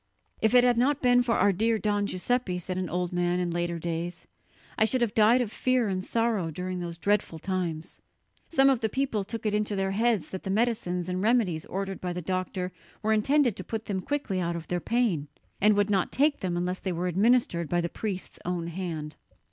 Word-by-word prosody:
"If 220 +2 +3
it 245 - +8
had 245 -1 +3
not 275 +3 +2
been 245 0 +5
for 240 -1 +1
our 205 - +4
dear 225 +4 +2
Don 205 -1 0
Giuseppe," 190 0 -1
said 180 +1 -4
an 185 -2 -2
old 180 +1 -2
man 175 0 +1
in 175 -1 -1
later 170 0 -1
days, 170 +1 -4 0.5
"I - - +3
should 250 +3 +2
have 230 -3 +1
died 225 +3 +5
of 225 -4 -2
fear 255 -1 +1
and 185 -1 -2
sorrow 225 -7 0
during 180 +3 -4
those 170 -1 -5
dreadful 200 -2 0
times." 170 -2 -3 0.5
Some 270 -5 +4
of 260 - +1
the 220 -2 0
people 255 -5 -1
took 225 +3 -7
it 210 - +1
into 210 0 0
their 195 0 0
heads 225 -1 +1
that 190 - -5
the - - -6
medicines 195 -5 0
and 185 0 -2
remedies 210 -8 +2
ordered 195 +1 -4
by 180 -1 -2
the 180 - -4
doctor 185 +1 -2 0.3
were 220 +1 +3
intended 245 +1 +3
to 185 - -5
put 220 +4 -5
them 190 -2 -2
quickly 275 -7 -2
out 170 -1 -1
of 165 -1 -7
their 180 - 0
pain, 205 -9 0 0.3
and 210 +1 +5
would 205 0 +2
not 190 -3 +1
take 290 +2 +2
them 175 -2 -2
unless 180 +1 -2
they 190 - -3
were 175 +1 -2
administered 180 - +2
by 175 - +1
the 170 - 0
priest's 190 +1 -5
own 175 -1 -2
hand. 165 -4 -5
195 Hz, 220 wpm, -27 LUFS, 175-230 Hz, 0.5 s, it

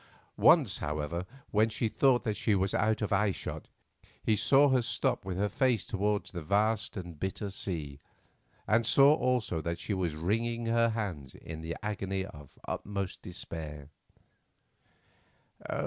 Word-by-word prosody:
Once, - - +5
however, 75 +4 -3 0.2
when 110 +2 +3
she 115 +1 -1
thought 125 +2 +3
that 110 -2 -1
she 105 +1 +1
was 95 0 0
out 110 0 +1
of 105 - -2
eyeshot, 100 0 -1 0.6
he 110 - +3
saw 140 +7 +5
her 130 -2 +3
stop 115 - -1
with 95 -2 -3
her 105 +2 +1
face 120 +1 +1
towards 105 0 -1
the 90 -3 -5
vast 105 +6 +1
and 85 -4 -7
bitter 95 +3 -3
sea, 80 -8 -4 0.7
and 115 +1 +3
saw 140 +3 +7
also 125 - 0
that 85 +2 -3
she 100 - -3
was 90 -5 -1
wringing 115 +8 -1
her 115 0 +3
hands 95 - -4
in 80 0 -8
an 80 +1 -3
agony 95 -2 -2
of 75 -6 -12
the - - -25
uttermost 100 -2 -4
despair. 75 -5 -7
100 Hz, 150 wpm, -30 LUFS, 85-110 Hz, 0.7 s, saw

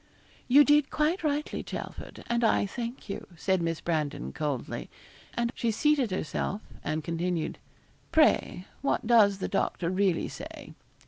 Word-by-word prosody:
'You 280 +4 +8
did 295 -1 +4
quite 315 +4 +1
rightly, 300 0 -1
Chelford, - - -7
and 235 0 0
I 225 - +3
thank 235 +4 -5
you,' 200 - -5
said 190 +2 +1
Miss 165 -1 -1
Brandon, 150 - -2
coldly; 145 -5 -3 0.5
and 235 0 0
she 235 - -1
seated 280 +1 +2
herself, 190 +2 -2 0.2
and 155 +1 -2
continued 170 0 -2 0.5
'Pray, 300 - +3 0.2
what 275 -3 0
does 215 -4 +5
the 190 - -3
doctor 170 0 0
really 185 -2 +1
say?' - - -9
200 Hz, 140 wpm, -29 LUFS, 170-260 Hz, 0.5 s, You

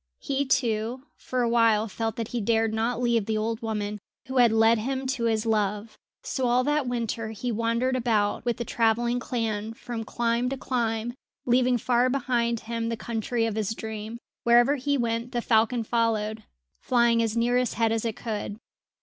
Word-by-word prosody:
He, 280 0 -1
too, 240 -1 0
for 255 -1 -2
a - - +2
while 230 -2 +3
felt 225 +1 -3
that 230 -1 -4
he 240 - -2
dared 225 +1 +1
not 230 +2 0
leave 235 -4 +1
the 220 -1 0
old 220 +1 -2
woman 210 -2 -3 0.3
who 260 +1 -4
had 240 -3 +6
led 225 +1 +4
him 265 +4 -2
to 260 -3 -1
his 220 -1 +1
love; 210 0 -1 0.3
so 260 -2 -1
all 245 +1 +3
that 295 -1 +1
winter 230 -2 -2
he 225 +3 -4
wandered 230 +3 0
about 220 -5 +1
with 240 -1 -1
the 235 - -3
travelling 235 +2 +1
clan, 225 -3 -3
from 240 -1 -5
clime 235 +2 0
to 270 - -3
clime, 235 -2 -1 0.3
leaving 250 0 +3
far 245 +2 +2
behind 240 -3 0
him 230 0 -3
the 230 - -2
country 225 +1 -2
of 225 - -1
his 220 0 -2
dream. 220 +1 -6 0.3
Wherever 240 +4 +5
he 285 +2 0
went 235 +1 -2
the 240 - +1
falcon 230 +1 +2
followed, 220 -1 0 0.4
flying 235 -2 +3
as 225 0 -1
near 240 +1 +2
his 250 -2 0
head 225 -1 +2
as 225 -1 0
it 225 -2 -2
could. 215 -3 -4
230 Hz, 185 wpm, -26 LUFS, 220-245 Hz, 0.4 s, had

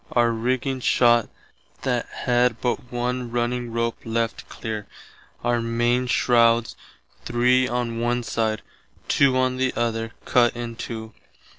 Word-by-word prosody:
Our 120 -1 +4
rigging 130 +3 -1
shott 120 -2 +3 0.5
that - - 0
had 120 -1 +1
but 125 0 -2
one 125 0 -2
running 120 0 -1
rope 115 0 -1
left 115 0 -2
clear, 110 -3 -5 0.6
our 120 0 +2
mainshrouds 120 0 +2 0.5
three 125 +1 +3
on 120 -2 -2
one 120 +1 0
side, 110 -2 -1 0.4
two 135 -2 +3
on 130 0 +1
the 130 0 +1
other 115 -1 -1
cutt 120 -1 +3
in 120 -1 -5
two. 110 -1 -6
120 Hz, 125 wpm, -24 LUFS, 115-125 Hz, 0.6 s, Our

